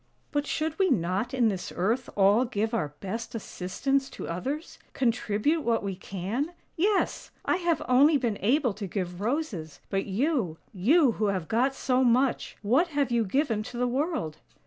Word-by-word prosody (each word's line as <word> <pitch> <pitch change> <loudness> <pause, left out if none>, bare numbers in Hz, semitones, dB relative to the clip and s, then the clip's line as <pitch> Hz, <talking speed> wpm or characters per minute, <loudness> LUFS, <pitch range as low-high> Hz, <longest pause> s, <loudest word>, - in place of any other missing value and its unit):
" - - -40
But 290 -1 -1
should 315 +2 -2
we 380 -1 +4
not 195 - 0
in 250 -4 +3
this 190 -3 -4
earth 225 +8 0
all 205 +4 +5
give 225 -2 -1
our 150 -10 -1
best 225 +5 -5
assistance 265 +7 -1
to - - -7
others 270 - -4
— - - -35
contribute 245 +4 +1
what 230 -5 +1
we 195 -1 -3
can? 200 - -3 0.2
Yes! 395 +4 +1 0.2
I - - +2
have 340 -3 0
only 285 +5 +6
been 235 -6 -1
able 245 +2 +2
to 200 0 -5
give 180 -1 -4
roses; 215 - -2
but 195 +1 0
you 215 - 0
— - - -36
you 300 -3 +6
who 215 - +1
have 190 -5 -1
got 255 +4 +1
so 260 -1 +1
much 250 +1 +2
— - - -41
what 320 +8 +5
have 285 -5 0
you 235 -1 +3
given 225 +1 0
to 240 +2 -7
the 250 - +1
world? 265 - -1
240 Hz, 190 wpm, -28 LUFS, 200-285 Hz, 0.2 s, only